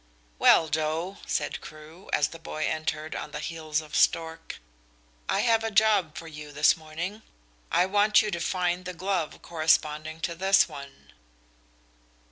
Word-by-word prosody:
"Well, 160 - +6
Joe," 160 +5 -2
said - - -2
Crewe, 155 +4 -13
as 145 - +2
the 165 - -11
boy 155 -1 -4
entered 155 0 -3
on - - -5
the - - -6
heels 155 -2 -3
of 155 -1 -9
Stork, 165 0 +1 0.7
"I - - +2
have 225 -2 +3
a 225 - -1
job 205 -6 +3
for 165 - -7
you 150 -1 -9
this 150 +1 +4
morning. 165 +7 -6 0.5
I 180 - +4
want 205 +2 +4
you 210 -1 0
to 170 - -2
find 180 +1 -1
the 180 0 -6
glove 185 -3 -2
corresponding 155 -1 0
to 170 - -2
this 190 +3 +4
one." 140 -3 -12
165 Hz, 155 wpm, -27 LUFS, 155-185 Hz, 0.7 s, Well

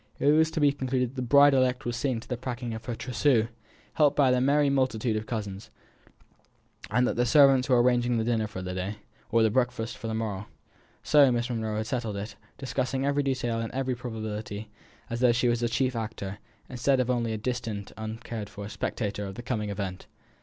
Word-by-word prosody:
It 145 - +3
was 160 +1 +4
to 160 - -3
be 145 -1 +5
concluded 130 -3 -1
that - - -19
the 130 - -3
bride 140 +3 +6
elect 130 -1 +2
was 120 0 -2
seeing 130 -2 -1
to - - -14
the 125 - -2
packing 120 -1 -5
of 110 +1 -7
her 120 - -3
trousseau, 120 -1 +1 0.4
helped 145 -2 +3
by 135 -3 +5
the 125 0 +2
merry 145 +2 +3
multitude 130 -5 +1
of 110 +1 -3
cousins, 105 -2 -5 1.2
and 125 0 +2
that - - -1
the 120 - +3
servants 135 -2 +5
were 125 -2 +5
arranging 120 -1 +2
the 110 - +1
dinner 115 -2 0
for 95 -3 -7
the 90 0 -4
day, 95 +3 -3 0.3
or 115 0 +3
the 110 - +3
breakfast 120 -1 0
for 115 - -5
the 110 - -2
morrow. 105 -3 -3 0.6
So 145 -3 +6
Miss 120 +1 -1
Monro 110 -2 -2
had 110 - -2
settled 115 -4 -3
it, 105 +3 -6 0.2
discussing 135 0 -2
every 140 +1 +2
detail 130 -4 -1
and 115 0 -3
every 130 0 -1
probability 110 -3 -5 0.4
as 115 - -4
though 125 -1 +5
she 125 +1 +1
were 120 - +4
a 120 0 0
chief 130 +2 0
actor, 105 -3 -5 0.3
instead 130 +2 +1
of 125 0 +1
only 120 -2 0
a 110 - -2
distant, 115 -3 -4
uncared 110 -1 -6
for 100 -1 -7
spectator 105 -2 -3
of 95 - -7
the 120 - -7
coming 110 -4 -2
event. 95 -2 -5
120 Hz, 210 wpm, -27 LUFS, 110-130 Hz, 1.2 s, bride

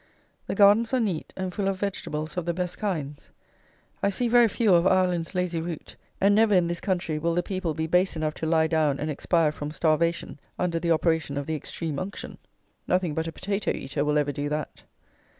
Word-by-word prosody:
The - - -2
gardens 215 +4 +5
are - - +2
neat, 195 -9 -2
and 185 -1 -3
full 200 0 -1
of 195 -1 -1
vegetables 155 -6 -3
of 180 -2 -3
the 170 - 0
best 180 -1 -3
kinds. 150 -9 -4 0.7
I 200 - +2
see 240 +5 0
very 240 0 +6
few 215 -1 +2
of 170 +1 +5
"Ireland's 180 -2 +1
lazy 180 -2 -1
root;" 165 -2 -6 0.2
and 200 +1 +4
never, 215 -1 +4
in 180 -2 +4
this 170 0 -3
country, 175 -6 -1
will 165 +2 0
the 175 - +1
people 185 -5 -3
be 160 - -1
base 180 +3 +2
enough 155 -1 -1
to 160 - -3
lie 160 0 +3
down 155 -3 +1
and 155 +1 -2
expire 160 +1 +1
from 150 -1 -6
starvation 160 0 0 0.2
under 170 -2 0
the 170 0 -2
operation 160 -3 +1
of 140 - -2
the 160 - -3
extreme 155 0 -4
unction! 190 +2 -6 0.5
Nothing 180 -3 +1
but 160 +2 -2
a - - -3
potato 200 +5 -2
eater 140 +2 -2
will 150 0 +1
ever 145 -1 +1
do 145 0 -3
that. 150 +1 -4
170 Hz, 210 wpm, -26 LUFS, 155-185 Hz, 0.7 s, very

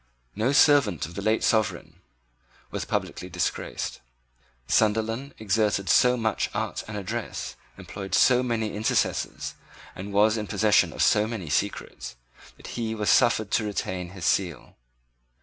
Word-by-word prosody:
No 110 +6 +1
servant 140 - +4
of 85 - -10
the 100 - -5
late 110 +2 +1
sovereign 110 -2 0 0.7
was - - -3
publicly - - -3
disgraced. - - -3 0.7
Sunderland 115 +5 +1
exerted 105 -3 0
so 125 0 +5
much 110 -2 -1
art - - -2
and 105 -1 -5
address, 100 -3 -5 0.2
employed 95 -1 -5
so 125 -1 +5
many 115 -4 -2
intercessors, 105 +1 -1 0.4
and 100 +3 -7
was 105 +2 +3
in 105 -1 -4
possession 105 +1 +3
of - - 0
so 105 +1 +3
many 100 -9 -5
secrets, 95 -9 -3 0.4
that - - -15 0.2
he 110 -1 -2
was 105 -1 +1
suffered 115 -4 +3
to - - +2
retain 95 -3 -3
his 90 -1 -7
seals. 90 -7 -1
105 Hz, 140 wpm, -26 LUFS, 100-115 Hz, 0.7 s, so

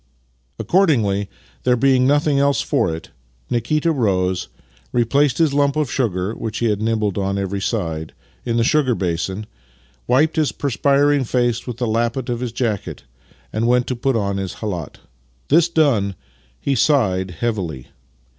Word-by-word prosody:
Accord 190 0 +3
ingly, 100 -7 +1 0.3
there 125 0 +3
being 130 0 +3
nothing 145 0 +2
else 140 0 +2
for 85 - +1
it, 80 +1 -7 0.4
Nikita 150 +8 +1
rose, 95 - 0 0.4
re 120 - +2
placed 140 +3 +2
his 160 -4 +2
lump 140 0 +2
of 150 -5 -1
sugar 100 -5 -1
(which 110 -1 -5
he 115 - +1
had 105 0 -2
nibbled 110 -3 0
on 100 0 -1
every 100 0 -2
side) 80 -7 -3 0.3
in 120 -1 -1
the 115 - +3
sugar 130 -1 +2
basin, 95 +3 -2 0.6
wiped 150 +7 +3
his 155 -3 +1
perspiring 140 +1 +2
face 120 -1 0
with 120 -2 -5
the 120 - -1
lappet 115 +3 -1
of 120 -1 -1
his 125 -2 -3
jacket, 110 -4 -3 0.5
and 110 +2 0
went 125 0 +3
to 130 - -2
put 130 +2 0
on 100 -3 -1
his 95 -2 -4
khalat. 90 -9 -5 0.5
This 170 +3 +4
done, 125 - +2 0.4
he 140 - 0
sighed 95 -11 +2
heavily. 90 - -3
120 Hz, 160 wpm, -20 LUFS, 100-140 Hz, 0.6 s, This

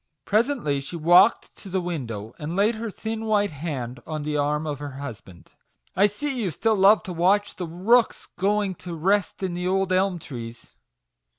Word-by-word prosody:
Presently 215 - +1
she 140 +5 -7
walked 175 +7 +4
to 195 - -11
the 190 +1 0
window, 120 - -5
and 155 +3 -4
laid 205 +4 +3
her 225 0 -5
thin 220 +2 -5
white 205 -2 +2
hand 135 -5 -5
on 155 -2 -4
the 150 0 -2
arm 150 +1 0
of 145 -2 -4
her 145 -2 -6
husband. 115 -10 -10 0.2
" - - -39
I 200 +2 +5
see 255 +5 -3
you 195 - 0
still 220 +7 +1
love 200 +2 +5
to 185 - -6
watch 195 +4 +2
the 180 - -4
rooks 210 +9 +2
going 200 +1 +1
to 175 -2 -6
rest 195 +4 0
in 185 -2 -1
the 180 +1 -3
old 190 0 +1
elm 185 0 +2
trees." 120 -7 -9
180 Hz, 190 wpm, -24 LUFS, 150-205 Hz, 0.2 s, I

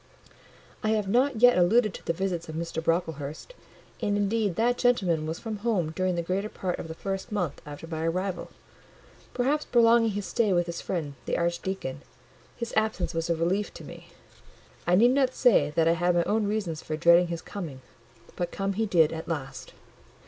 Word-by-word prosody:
I 215 - 0
have 210 -2 -2
not 245 +2 +1
yet 245 -6 +7
alluded 215 +4 +4
to - - -9
the - - 0
visits 175 -1 -3
of 155 - -6
Mr. 165 0 -3
Brocklehurst; 160 - -2 0.5
and 205 0 +1
indeed 205 -2 0
that 240 +4 +1
gentleman 180 -11 +2
was 160 +1 -3
from 220 -2 -5
home 200 -7 0
during 185 +2 -1
the 170 - -1
greater 195 +5 -2
part 185 -4 -3
of - - -6
the 160 - -7
first 195 +3 -4
month 180 -9 -2
after 145 +2 -8
my 165 0 -3
arrival; 185 +1 -2 0.9
perhaps 285 +5 +1
prolonging 230 -2 +4
his 205 -1 -3
stay 215 -4 +1
with 175 -1 +2
his 170 0 -5
friend 160 -6 -3
the - - 0
archdeacon: 170 -5 -2 0.5
his 235 -1 -5
absence 220 -3 0
was 165 0 -2
a 170 - +2
relief 180 +5 0
to - - -9
me. - - -11 0.8
I 175 - +5
need 235 +6 +6
not 260 -1 +2
say 220 - +4
that 165 -1 +3
I 165 - +5
had 175 +1 +1
my 170 - +3
own 210 +2 0
reasons 200 -7 -2
for 155 - -4
dreading 170 +2 +5
his 170 -1 -5
coming: 160 -10 -7 0.5
but 175 -1 -3
come 195 0 -2
he 220 +3 -1
did 165 -5 +4
at 160 0 -6
last. 135 -5 -5
180 Hz, 190 wpm, -27 LUFS, 165-215 Hz, 0.9 s, yet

